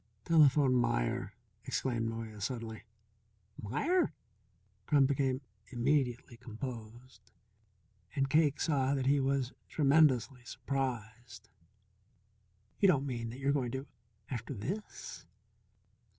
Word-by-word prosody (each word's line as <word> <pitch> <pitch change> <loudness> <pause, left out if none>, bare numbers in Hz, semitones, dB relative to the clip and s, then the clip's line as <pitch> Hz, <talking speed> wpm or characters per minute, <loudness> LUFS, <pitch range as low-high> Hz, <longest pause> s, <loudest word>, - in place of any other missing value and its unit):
"Telephone 145 -4 +5
Meier," 120 - 0 0.3
exclaimed 115 -3 -1
Noyes 110 -3 -5
suddenly. 115 -3 -5 0.8
"Meier?" 305 - +1 0.7
Crum 145 -2 +5
became 135 -1 0 0.3
immediately 125 -1 0
composed, 115 -2 -9 0.9
and 135 -1 +2
Cake 150 0 +3
saw 140 -3 +1
that 135 -2 -1
he 140 +1 +4
was 135 -1 0 0.2
tremendously 140 -4 +3
surprised. 120 -5 -4 1.3
"You 200 - +5
don't 140 -7 +3
mean 120 -4 -3
that 120 - -8
you're 140 +1 +1
going 130 -4 0
to 135 +1 -3 0.5
After 125 +2 -4
this? 185 - -6
130 Hz, 100 wpm, -33 LUFS, 115-140 Hz, 1.3 s, Telephone